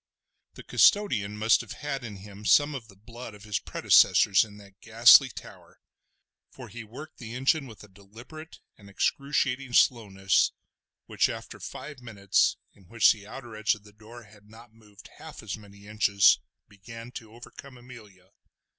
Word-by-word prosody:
The - - -12
custodian 105 - +2
must 110 +1 +3
have - - -9
had 140 -3 -6
in 110 -4 -8
him 100 +1 -13
some 145 +7 +3
of 125 -5 -8
the 100 - -18
blood 115 +2 -11
of 100 - -16
his 105 -3 -3
predecessors 95 -2 +3
in 105 -2 -13
that 100 -1 -18
ghastly 115 +4 +6
tower, - - -14 0.7
for - - -12
he 120 -1 -9
worked 140 +8 -12
the 115 -2 -8
engine 135 +3 0
with 110 -3 -14
a - - -14
deliberate 115 - -14 0.2
and 100 -1 -16
excruciating 135 +3 -2
slowness 100 -6 +2 0.5
which - - 0
after - - -8
five 140 +1 -9
minutes, 100 -5 0 0.2
in 95 - -23
which 115 +3 +4
the 105 -2 -7
outer 120 -1 -10
edge 110 0 0
of 105 - -18
the 105 -1 -18
door 110 +3 -14
had 105 -1 -20
not 115 +1 -17
moved 105 -3 -18
half - - -11
as - - -5
many 100 -1 -16
inches, 100 -2 +3 0.3
began 115 +4 -12
to 110 -3 -11
overcome 120 +2 -13
Amelia. 105 -7 -16
110 Hz, 165 wpm, -26 LUFS, 105-125 Hz, 0.7 s, ghastly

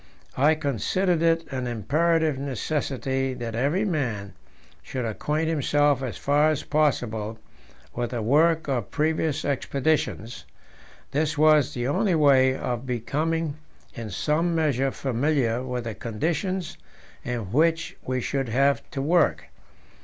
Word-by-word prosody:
I 150 +4 +4
considered 160 - 0
it 165 0 +2
an 130 -2 -3
imperative 155 - +1
necessity 135 -1 -2
that 120 -2 -5
every 145 - +1
man 115 - -2 0.5
should 125 -2 -4
acquaint 150 +8 -1
himself 145 -3 +2
as 130 -4 -4
far 145 +2 +3
as 155 -2 -1
possible 115 -8 0 0.6
with 120 -1 -2
the 120 -2 -3
work 160 +6 +3
of 125 -7 -1
previous 155 -1 0
expeditions; 140 -3 -1 0.7
this 155 +1 0
was 155 -2 +4
the 120 0 -2
only 185 +5 +1
way 135 -4 +5
of 125 0 -3
becoming 150 +6 -1 0.4
in 115 -2 -6
some 160 - 0
measure 140 -4 +1
familiar 130 -2 0
with 125 -1 -4
the 115 -1 -4
conditions 160 - -3 0.4
in 115 -6 -4
which 165 +5 +1
we 130 0 -2
should 135 0 -2
have 135 +4 +2
to 135 - -3
work. 170 +2 +2
140 Hz, 130 wpm, -25 LUFS, 125-155 Hz, 0.7 s, way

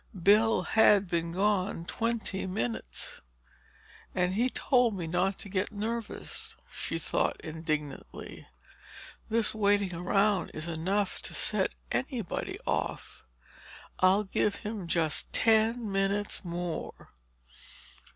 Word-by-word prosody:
Bill 210 0 +5
had 205 -1 +5
been 170 -1 -1
gone 190 -1 0
twenty 225 -3 -1
minutes. 120 - -3 0.9
"And 180 0 +1
he 240 +6 +2
told 245 -4 +2
me 175 -3 -3
not 180 +4 0
to - - -7
get 190 +1 -1
nervous," 225 +2 -3
she - - -3
thought - - 0
indignantly. 155 -3 -5 0.8
"This 225 -1 +3
waiting 205 -3 +2
around 195 +3 +1
is 155 +2 -3
enough 185 +5 -1
to - - -5
set - - +1 0.2
anybody 235 - -2
off—I'll 185 - -2
give 200 +1 0
him 210 -4 -5
just 165 -2 +1
ten 225 0 +3
minutes 195 +2 0
more!" 175 -1 -5
195 Hz, 105 wpm, -30 LUFS, 175-215 Hz, 0.9 s, Bill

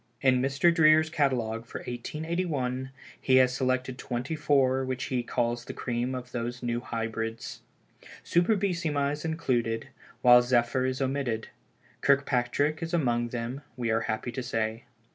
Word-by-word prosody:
In 130 -2 +4
Mr. 135 +6 +3
Dreer's 155 -1 +5
catalogue 115 -6 0
for - - -6
1881, 135 -1 -3 0.3
he 130 - +3
has 130 -1 +5
selected 130 0 -1
twenty 125 +5 -3
four 135 -3 +2
which 130 0 -3
he 125 -2 -1
calls 120 0 -1
the - - -7
cream 125 +1 -2
of 125 -1 -7
those 120 +1 -4
New 120 0 -1
Hybrids. 115 -1 -4 0.6
Superbissima 170 -6 +1
is 150 +1 -5
included, 130 -7 -1 0.3
while 125 0 +8
Zephyr 120 +1 +2
is 130 +1 -1
omitted. 130 -5 -2 0.5
Kirkpatrick 140 +2 +2
is 165 +1 -2
among 120 -6 +1
them, 120 +3 -4 0.2
we 120 -2 -1
are 115 +1 +2
happy 110 +3 -2
to 130 - -4
say. 115 -1 -2
130 Hz, 145 wpm, -28 LUFS, 120-145 Hz, 0.6 s, while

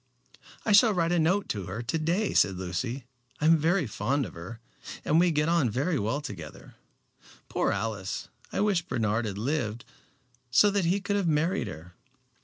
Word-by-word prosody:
"I 215 - +1
shall 210 +1 +6
write 170 -1 +1
a 175 - +2
note 185 +5 +2
to 100 -4 -3
her 100 +6 -5
to 130 +7 -1
day," 175 +7 0
said 95 - +3
Lucy. 115 +8 -3 0.3
"I 150 - -1
am 165 +1 +7
very 165 +2 +2
fond 125 +6 -1
of - - -9
her, 90 +7 -9 0.5
and 155 - +4
we 175 +1 +4
get 150 -1 +1
on 165 -7 +2
very 145 - 0
well 115 +8 -1
together. 95 - -9 0.8
Poor - - +1
Alice. 105 -4 -3 0.2
I - - -1
wish 205 -4 +2
Bernard 115 -6 -1
had 100 -2 -4
lived, 115 -2 -2 0.6
so 200 +12 +5
that 200 -3 +1
he 190 +4 +1
could 200 +1 -1
have 195 -4 0
married 165 +5 +1
her." 80 +4 -9
145 Hz, 185 wpm, -28 LUFS, 110-175 Hz, 0.8 s, am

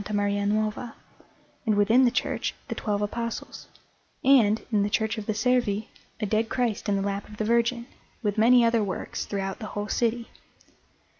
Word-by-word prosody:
Maria 205 0 0
Nuova, 215 +3 -1 0.7
and, 220 -5 +1
within 220 +6 +5
the - - +5
church, 245 - -2
the - - -1
twelve 210 -1 -2
Apostles; 230 +2 -5 0.6
and, 225 -6 +4
in 210 -2 +3
the 205 - +1
Church 220 +1 0
of 205 - -8
the 215 - +1
Servi, 220 -2 +1 0.3
a 215 - -1
Dead 220 +2 0
Christ 240 -5 -1
in 200 - +2
the 195 - 0
lap 200 +1 -3
of 210 - -11
the 215 - -1
Virgin, 235 +1 +1 0.4
with 205 -2 0
many 235 +2 +5
other 230 -1 +3
works 195 -2 -4
throughout 195 -1 -3
the 215 - -6
whole 205 +1 -3
city. 235 0 0
215 Hz, 175 wpm, -26 LUFS, 205-235 Hz, 0.7 s, within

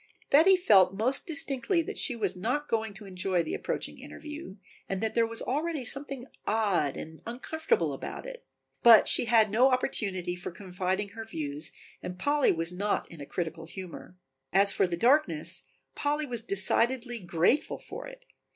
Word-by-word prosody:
Betty 325 +7 +7
felt 195 - +4
most 255 +7 +2
distinctly 315 +2 +2
that 415 +6 -6
she 255 - 0
was 200 -5 -2
not 250 +11 -2
going 220 -1 -1
to 205 +1 -11
enjoy 185 -2 -1
the 160 - -5
approaching - - -4
interview, 300 - -9 0.3
that 205 +3 -2
there 230 -1 +2
was 230 0 -5
already 300 0 -2
something 275 0 -1 0.2
odd 200 -10 +1
and 160 0 -9
uncomfortable 315 - -1
about - - -7
it, - - -9 0.4
but 230 -3 +8
she - - +3
had 220 -2 +4
no 250 +5 +5
opportunity 195 -8 0
for 180 - -6
confiding 185 +2 -3
her 225 +2 -8
views 150 -7 -5 0.3
and 180 0 -6
Polly 290 +8 +2
was 165 +1 -2
not 200 +3 -1
in 165 -3 -11
a 140 - -8
critical 165 -2 -5
humor. 180 0 -10 0.3
As 195 +1 +6
for - - +2
the 170 -1 -3
darkness 235 - +1 0.3
Polly 295 +1 -1
was 240 -4 -3
decidedly 235 +5 +2
grateful 175 - +1
for - - -9
it. - - -13
220 Hz, 165 wpm, -28 LUFS, 180-275 Hz, 0.4 s, but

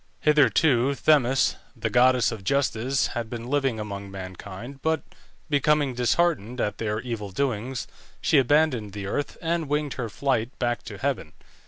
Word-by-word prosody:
Hitherto 140 -2 +4
Themis, 135 -3 +3 0.2
the - - -3
goddess 125 0 +4
of 110 -4 -7
Justice, 135 +1 +1
had 115 -2 -3
been 120 0 -6
living 135 -6 +1
among 100 -2 -5
mankind, 95 +7 -8
but 160 -1 0 0.4
becoming 145 -2 +2
disheartened 125 - +1
at 105 - -1
their 105 -1 -1
evil 115 -4 -4
doings, 125 +3 -2 0.3
she 150 - +4
abandoned 130 -6 +2
the 100 -1 -5
earth, 145 +9 -3
and 165 -2 -1
winged 150 -1 0
her 115 - -3
flight 130 0 -1
back 120 -3 -1
to - - -7
heaven. - - -2
125 Hz, 150 wpm, -25 LUFS, 110-140 Hz, 0.4 s, Hitherto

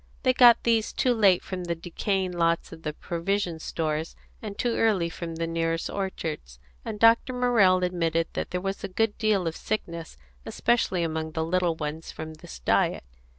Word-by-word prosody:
They 255 -2 +4
got 240 -2 +7
these 225 -2 +1
too 250 - +2
late 200 -6 +4
from 180 -2 -5
the 170 -1 -1
decaying 185 +3 -2
lots 170 -1 0
at 160 - -11
the 150 - -3
provision 175 +1 -2
stores, 155 0 -3 0.3
and 205 -2 -7
too 240 -2 0
early 190 -7 +2
from 165 -1 -6
the 165 +1 -2
nearest 165 0 -1
orchards; 160 - -4 0.3
and 210 - -5
Dr. 230 +3 +5
Morrell 225 -8 +4
admitted 165 -2 0
that - - -3
there 180 - -3
was 195 +1 -4
a - - -1
good 205 +3 0
deal 215 -5 +2
of 165 0 -2
sickness, 170 - -4 0.3
especially 190 - +1
among 160 -1 -3
the 160 0 -1
little 175 0 +1
ones, 155 +1 -5
from 155 0 -7
this 155 - -11
diet. - - +1
175 Hz, 180 wpm, -26 LUFS, 165-205 Hz, 0.3 s, got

